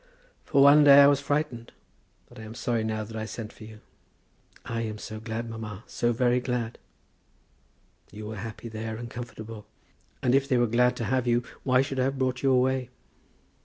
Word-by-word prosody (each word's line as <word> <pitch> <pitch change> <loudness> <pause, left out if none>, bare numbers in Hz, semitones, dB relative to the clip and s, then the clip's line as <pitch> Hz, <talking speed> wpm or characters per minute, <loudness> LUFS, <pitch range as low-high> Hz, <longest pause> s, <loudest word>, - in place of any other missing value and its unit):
For 140 - +4
one 145 +2 +8
day 140 0 +9
I - - +8
was 140 -1 +4
frightened; 140 -5 -2 0.6
but - - -15
I - - -8
am 110 +1 -9
sorry 115 -2 -1
now 110 -1 -2
that 110 +1 -10
I 110 0 -3
sent 110 0 -7
for 110 - -12
you." 110 0 -13 0.8
"I 115 0 -3
am 110 -2 -4
so 110 0 -7
glad, 110 +1 -5
mamma; 110 -2 -7
so 120 - -1
very 120 +1 +2
glad." 125 -2 -3 1.3
"You 105 +2 -8
were 110 0 -6
happy 110 +3 -7
there, 110 0 -5
and 120 0 -8
comfortable. 115 -3 -8 0.6
And 125 - +3
if 135 +1 +2
they 130 - +3
were 120 - +3
glad 125 +2 +2
to 120 - -4
have 125 +1 0
you, 120 0 +2 0.2
why 130 0 +3
should 135 -1 -4
I 130 - +2
have 135 +1 -1
brought 130 -1 -1
you 135 - +2
away?" 130 -1 +2
120 Hz, 200 wpm, -27 LUFS, 110-130 Hz, 1.3 s, day